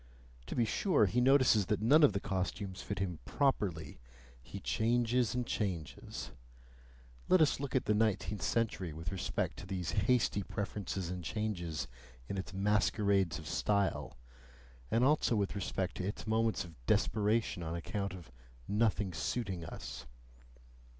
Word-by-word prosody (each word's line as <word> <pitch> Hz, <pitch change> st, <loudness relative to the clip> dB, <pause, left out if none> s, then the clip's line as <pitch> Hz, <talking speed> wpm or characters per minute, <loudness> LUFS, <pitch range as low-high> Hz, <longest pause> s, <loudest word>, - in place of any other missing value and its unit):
To -, -, -4 dB
be 120 Hz, -, +3 dB
sure, 150 Hz, -, +3 dB
he 120 Hz, +6 st, +1 dB
notices 130 Hz, -6 st, +5 dB
that 105 Hz, -, +1 dB
none 135 Hz, +9 st, +5 dB
of 145 Hz, -9 st, +6 dB
the 100 Hz, -, 0 dB
costumes 95 Hz, 0 st, -3 dB
fit 100 Hz, -, -4 dB
him 90 Hz, -4 st, -2 dB
properly 100 Hz, -, 0 dB, 0.4 s
he -, -, -8 dB
changes 120 Hz, +1 st, +1 dB
and 125 Hz, -1 st, 0 dB
changes. 90 Hz, -, -4 dB, 1.0 s
Let 185 Hz, -, +6 dB
us 155 Hz, -4 st, +3 dB
look 140 Hz, -1 st, -4 dB
at 130 Hz, -, +2 dB
the 105 Hz, -, +3 dB
nineteenth 105 Hz, -1 st, 0 dB
century 100 Hz, -8 st, 0 dB
with 80 Hz, +2 st, -5 dB
respect 95 Hz, -, -2 dB
to -, -, -8 dB
these 90 Hz, -3 st, -2 dB
hasty 110 Hz, -1 st, +2 dB
preferences 95 Hz, -3 st, -4 dB
and 90 Hz, -1 st, -5 dB
changes 85 Hz, -9 st, -3 dB, 0.4 s
in 100 Hz, -, -3 dB
its 95 Hz, -, -5 dB
masquerades 100 Hz, -2 st, +2 dB
of 80 Hz, -, -9 dB
style, 100 Hz, -7 st, 0 dB, 0.7 s
and 115 Hz, +2 st, +2 dB
also 140 Hz, -3 st, +3 dB
with 100 Hz, -2 st, 0 dB
respect 95 Hz, -1 st, -2 dB
to 90 Hz, -, -2 dB
its 105 Hz, -, -5 dB
moments 110 Hz, -2 st, +1 dB
of 80 Hz, -8 st, -15 dB
desperation 110 Hz, -3 st, +2 dB
on 85 Hz, 0 st, -3 dB
account 100 Hz, +3 st, -3 dB
of 85 Hz, -9 st, -12 dB, 0.4 s
"nothing 105 Hz, -3 st, +1 dB
suiting" 95 Hz, +1 st, -2 dB
us. 65 Hz, -6 st, -7 dB
100 Hz, 150 wpm, -33 LUFS, 90-115 Hz, 1.0 s, of